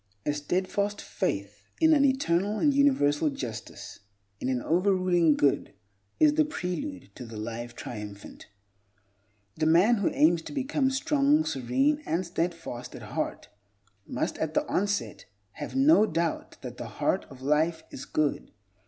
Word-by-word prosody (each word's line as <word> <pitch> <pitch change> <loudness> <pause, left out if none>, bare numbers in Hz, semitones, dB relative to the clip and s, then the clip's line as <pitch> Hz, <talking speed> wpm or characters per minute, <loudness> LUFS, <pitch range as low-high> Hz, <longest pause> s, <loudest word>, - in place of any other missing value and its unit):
A 145 - +1
steadfast 185 +7 -1
faith 100 - -3 0.2
in 320 -1 +5
an 285 -2 +4
Eternal 210 -7 +1
and 290 +5 +3
Universal 160 - +3
Justice, 120 -5 -7 0.4
in 130 - -2
an 130 -1 0
over 180 +9 +2
ruling 175 -4 +3
Good, 140 -7 +1 0.4
is 305 -1 +5
the 310 +1 +4
prelude 280 - -5
to 125 - -9
the 115 -2 -9
Life 115 +2 -6
Triumphant. 105 -3 -8 1.1
The 155 0 +1
man 185 +9 +5
who 200 - +1
aims 165 +2 +3
to 165 - -9
become 275 0 0
strong, 285 +3 +2
serene, 270 - +1
and 175 +3 0
steadfast 165 -8 -4
at - - -9
heart - - -3 0.6
must, - - -3
at 160 0 -2
the - - +2
onset, 200 +1 -1 0.3
have - - -7
no 270 -5 +5
doubt 165 -1 -2
that - - -7
the - - -6
Heart - - -1
of 130 -1 -13
Life 160 +3 +1
is 130 - -8
good. 155 -2 -1
175 Hz, 150 wpm, -28 LUFS, -, 1.1 s, in